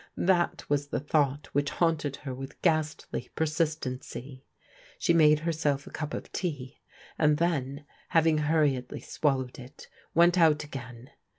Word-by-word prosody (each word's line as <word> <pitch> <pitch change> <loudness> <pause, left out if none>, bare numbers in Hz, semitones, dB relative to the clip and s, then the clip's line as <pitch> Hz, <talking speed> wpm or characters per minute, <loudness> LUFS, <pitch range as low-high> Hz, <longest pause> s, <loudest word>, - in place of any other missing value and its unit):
That 175 -1 +1
was 145 0 0
the - - -2
thought 145 0 +1
which 145 0 +1
hatmted 155 -5 +1
her 135 -3 -4
with 135 +1 -8
ghastly 155 -6 0
persistency. 150 -4 -3 0.5
She 170 - +2
made 150 -2 +5
herself 150 -4 0
a - - -11
cup 150 -1 -4
of - - -7
tea, 145 -8 -4 0.4
and 150 -1 +4
then, 145 -4 -1 0.2
having 160 -1 +3
hur 155 +1 +3
riedly 130 -3 -2
swallowed 130 -4 -1
it, 130 +2 -12 0.3
went 175 +2 +5
out 155 -3 +4
again. 125 -4 -9
150 Hz, 140 wpm, -28 LUFS, 135-160 Hz, 0.5 s, made